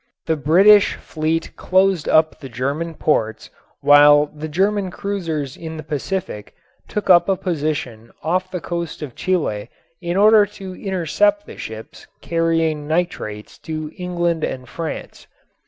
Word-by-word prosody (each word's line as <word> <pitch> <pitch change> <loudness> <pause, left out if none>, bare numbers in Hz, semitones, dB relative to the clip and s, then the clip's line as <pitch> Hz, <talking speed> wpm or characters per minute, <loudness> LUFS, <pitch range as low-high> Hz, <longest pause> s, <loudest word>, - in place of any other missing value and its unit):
The 160 - +1
British 190 +8 +5
fleet 160 +1 -3
closed 185 -3 +2
up 155 0 +3
the 135 - -9
German 140 +7 -3
ports 110 -9 -1 0.3
while 145 0 +7
the 155 +1 -5
German 195 +4 0
cruisers 165 -8 -4
in 160 -1 -7
the 155 - -7
Pacific 150 - -4 0.3
took 210 - -4
up 175 +2 +6
a 195 - +3
position 145 - -3
off 185 +3 0
the 180 -2 -5
coast 170 -3 -4
of 135 -5 -7
Chile 120 - -1 0.3
in 175 +1 -2
order 210 0 +6
to 195 -2 -9
intercept 205 - 0
the - - -11
ships - - -9
carrying 165 -3 0
nitrates 155 -11 -3
to 155 -1 -5
England 175 -2 -1
and 130 -1 -4
France. 160 +5 -7
165 Hz, 140 wpm, -20 LUFS, 150-185 Hz, 0.3 s, while